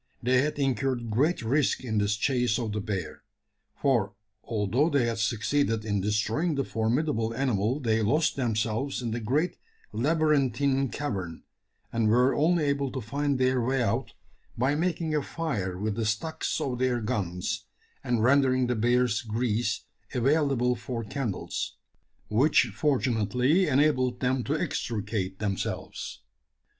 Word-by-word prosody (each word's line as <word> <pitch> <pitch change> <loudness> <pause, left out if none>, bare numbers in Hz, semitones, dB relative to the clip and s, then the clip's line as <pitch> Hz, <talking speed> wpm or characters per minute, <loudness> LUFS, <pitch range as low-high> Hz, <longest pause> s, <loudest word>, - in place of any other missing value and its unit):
They 125 +1 +4
had 150 +1 -1
incurred 130 -4 0
great 145 +7 +1
risk 135 +4 +1
in 110 -4 0
this 105 0 +1
chase 120 0 +1
of 115 -3 -2
the 105 0 -2
bear: 95 -5 -4 0.6
for 115 -8 +1 0.3
although 115 - +1
they 140 -6 +2
had 115 -1 -2
succeeded 115 +1 0
in 105 -2 0
destroying 110 - 0
the 135 - 0
formidable 115 0 0
animal 125 -1 0
they 110 -4 +1
lost 150 +10 +2
themselves 120 +2 -1
in 115 - -2
the 115 - -2
great 140 +10 0 0.4
labyrinthine 140 -1 +2
cavern, 95 - -4 0.5
and 115 -1 +2
were 125 +4 +4
only 165 +2 +2
able 140 -2 0
to 135 - -2
find 140 +4 -1
their 130 -1 +2
way 130 +1 +1
out 100 - -1 0.4
by 130 +4 +2
making 165 0 -1
a 150 - +2
fire 110 - -3
with 105 +2 -1
the 115 +1 -2
stocks 155 +10 -2
of 125 -3 -2
their 125 -1 +1
guns, 90 -5 -3 0.4
and 120 -3 0
rendering 130 0 +4
the 125 0 0
bear's 120 0 +2
grease 115 -1 -1 0.3
available 130 -2 +2
for 120 0 -5
candles 110 -2 -4 0.5
which 125 +1 +3
fortunately 130 - +2
enabled 130 -3 +2
them 130 0 0
to 150 +3 0
extricate 105 - -2
themselves. 100 -2 -4
125 Hz, 140 wpm, -27 LUFS, 110-140 Hz, 0.6 s, They